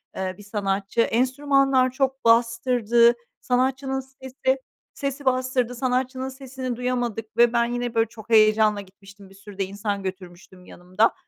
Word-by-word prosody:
eee, 185 -1 -3
bir 205 - -13
sanatçı. 200 +1 -1
Enstrümanlar 260 +2 +2
çok 265 0 -2
bastırdı. 235 0 +4 0.3
Sanatçının 265 +1 0
sesi 265 0 -3 0.4
sesi 275 0 -5
bastırdı. 255 -1 0
Sanatçının 255 +1 -1
sesini 260 -1 -6
duyamadık 240 -3 -3
ve 240 0 +5
ben 235 0 +3
yine, 245 0 -3
böyle, 225 0 +3
çok 225 -1 -13
heyecanla 215 -1 +4
gitmiştim, 195 0 -16
bir 195 - -17
sürü 200 0 -13
de 195 - 0
insan 200 +1 -4
götürmüştüm 185 -1 -9
yanımda. 185 +6 0
235 Hz, 140 wpm, -24 LUFS, 205-260 Hz, 0.4 s, ve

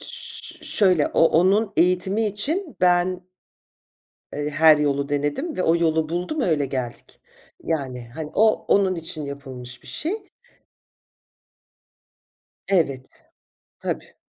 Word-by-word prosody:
Ş - - -4
şöyle 185 -8 +3
o - - +3
onun 195 +6 +3
eğitimi 190 +5 +2
için 295 - -2
ben 180 0 +2 1.1
eee, 150 0 -3
her 155 +1 +6
yolu 140 -1 0
denedim 145 - -2
ve 185 - 0
o 165 +1 +3
yolu 160 -2 +1
buldum, 180 - -2
öyle 155 - +1
geldik. 125 -3 -6 0.4
Yani, 130 -7 -3
hani, 155 -1 -6
o, 220 0 +3
onun 195 -2 +3
için 160 -3 -3
yapılmış 130 -3 -8
bir - - -16
şey. 390 +5 -3 2.4
Evet. 140 -9 -1 0.5
Tabii. - - -5
165 Hz, 115 wpm, -23 LUFS, 145-195 Hz, 2.4 s, her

